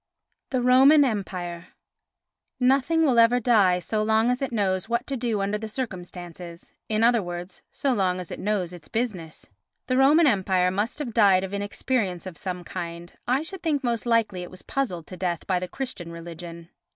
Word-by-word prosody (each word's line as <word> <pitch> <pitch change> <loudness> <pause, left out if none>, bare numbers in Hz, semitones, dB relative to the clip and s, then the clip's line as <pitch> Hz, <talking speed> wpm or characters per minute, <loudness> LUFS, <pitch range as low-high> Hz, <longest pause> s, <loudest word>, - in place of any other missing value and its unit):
The 255 -2 0
Roman 270 +4 +6
Empire 180 -7 -4 0.9
Nothing 275 +6 +3
will 255 -6 +4
ever 230 +2 +5
die 210 -7 +4
so 215 +4 -2
long 220 +2 +3
as 250 +2 -2
it 270 - -2
knows 195 -3 0
what 235 +1 0
to 275 - -3
do 230 -5 -1
under 200 +2 -1
the 220 0 -6
circumstances, 180 -6 -7 0.2
in 215 0 +1
other 235 -1 +4
words 175 0 -7
so 275 -2 0
long 185 -4 +1
as 180 - -7
it - - -6
knows 195 -4 -1
its 175 -3 -11
business. 195 -9 -4 0.4
The 255 - 0
Roman 295 +5 +6
Empire 190 -6 +2
must 205 +5 -2
have 275 -6 -4
died 195 -4 +5
of 190 +1 -5
inexperience 200 -2 -2
of 185 -3 -7
some 180 0 -5
kind, 170 -1 -7
I 260 +5 +2
should 375 +2 -6
think 295 -4 0
most 240 -1 -1
likely 225 -6 +1
it 180 - -7
was 185 - -11
puzzled 185 -12 -2
to 185 - -10
death 175 -2 -2
by 185 -2 +1
the 185 - -4
Christian 195 -9 -6
religion. 170 0 -9
205 Hz, 190 wpm, -25 LUFS, 180-245 Hz, 0.9 s, Roman